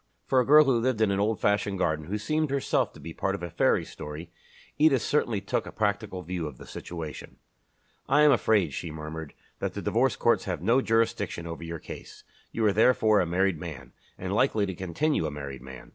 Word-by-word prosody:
For 130 - +3
a 125 - +2
girl 150 +2 +8
who 130 -4 +3
lived 125 -1 0
in 110 -2 +3
an 100 - 0
old 105 +1 +1
fashioned 100 -1 +1
garden, 80 -4 0
and 85 - -10
who 105 - 0
seemed 155 +8 0
herself 140 0 0
to - - -14
be 80 +2 -8
part 95 +3 -1
of 95 - -8
a 85 - -5
fairy - - +2
story, 75 +3 -8 0.5
Edith 150 -5 +4
certainly 120 -8 0
took 100 - -2
a - - -7
practical 100 -3 -2
view 90 -3 -3
of 70 -4 -9
the - - -11
situation. 80 -3 -8 0.7
"I 145 +2 +5
am 150 - +7
afraid," 105 - +2
she 85 - -4
murmured, 80 0 -7 0.2
"that - - -3
the - - -3
Divorce - - +2
Courts - - +2
have - - -2
no 120 +7 +4
jurisdiction 115 -7 0
over 85 0 -6
your 85 0 -5
case. - - -10 0.3
You 115 - 0
are 105 - +4
therefore 110 -1 +4
a 90 - +1
married 90 0 +1
man, 70 -7 -8 0.3
and - - -4
likely 105 -2 +2
to 95 - -4
continue 95 - -1
a - - -4
married 70 -3 -7
man. 65 0 -11
95 Hz, 220 wpm, -27 LUFS, 80-115 Hz, 0.7 s, girl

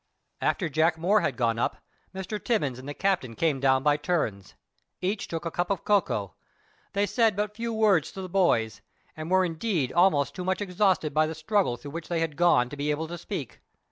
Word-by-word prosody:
After 180 - +1
Jack 160 +2 +2
Moore 195 +6 +3
had 135 -7 -1
gone 115 -2 +1
up - - 0 0.3
Mr. 190 +2 -5
Timmins 145 - 0
and 130 +2 -8
the - - -4
captain 180 -12 0
came 155 -2 +1
down 130 0 +3
by 145 0 +3
turns. 145 - -2 0.4
Each 200 +3 -2
took 165 0 -5
a 165 - -2
cup 175 +2 -1
of 195 -4 -1
cocoa. 110 - +1 0.6
They 200 0 +2
said 225 -1 +2
but 210 +1 -2
few 230 +1 -3
words 210 -8 +2
to 190 - -6
the - - -5
boys, 170 - +1 0.3
and 155 +1 -6
were 185 0 +4
indeed 165 - -1
almost 175 -6 +3
too 185 - -5
much 185 0 0
exhausted 185 -5 +1
by 155 +1 +3
the 160 - -5
struggle 160 - 0
through 145 +4 -9
which 165 +1 -6
they 170 -1 -1
had 160 -3 -2
gone 165 -7 +4
to 145 - -7
be 145 +1 -2
able 155 +2 -1
to 175 - -5
speak. 160 - -6
165 Hz, 210 wpm, -27 LUFS, 145-195 Hz, 0.6 s, were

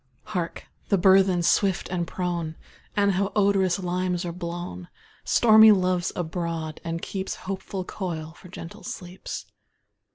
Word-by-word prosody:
Hark! 175 -5 -4 0.2
the 200 - +4
burthen, 190 -1 +5
swift 190 +1 +2
and 175 -2 -2
prone! 170 -3 -3 0.4
And 200 -1 +4
how 195 +1 +1
the - - -6
odorous 195 -3 +3
limes 180 -1 -1
are 170 - -2
blown! 170 - -6 0.4
Stormy 220 -1 +7
Love's 185 -2 +2
abroad, 165 -2 -3
and 165 0 -4
keeps 190 -1 -3
Hopeful 190 0 -4
coil 165 -5 -5
for - - -14
gentle 170 -1 -9
sleeps. 180 0 -7
180 Hz, 135 wpm, -25 LUFS, 170-195 Hz, 0.4 s, Stormy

